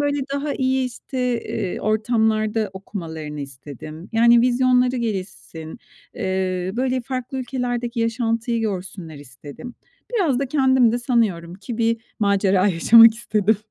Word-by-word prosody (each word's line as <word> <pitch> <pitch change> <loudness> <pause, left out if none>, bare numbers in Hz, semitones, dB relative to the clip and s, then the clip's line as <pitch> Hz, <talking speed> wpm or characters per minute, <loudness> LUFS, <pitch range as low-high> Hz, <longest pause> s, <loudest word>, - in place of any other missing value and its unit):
böyle, 290 0 0 0.2
daha 285 +1 -2
iyi 260 -1 +1
işte, 255 +2 -8 0.2
eee, 200 -6 -4
ortamlarda 215 -1 +1
okumalarını 160 -6 -7
istedim. 145 +4 -9
Yani, 235 +1 +5
vizyonları 250 +1 +3
gelişsin. 190 -6 -5 0.4
Eee, 185 -2 -2
böyle, 255 0 0
farklı 255 +1 -4
ülkelerdeki 245 -2 -3
yaşantıyı 230 0 -1
görsünler 185 -6 -5
istedim. 145 - -11 0.4
Biraz 325 - +2
da 275 - -1
kendim 260 -5 +3
de 240 - 0
sanıyorum 215 -9 0
ki 220 +5 -7
bir 230 0 +2 0.2
macera 200 -2 +2
yaşamak 225 +6 +7
istedim. 220 -2 +1
225 Hz, 125 wpm, -22 LUFS, 190-245 Hz, 0.4 s, yaşamak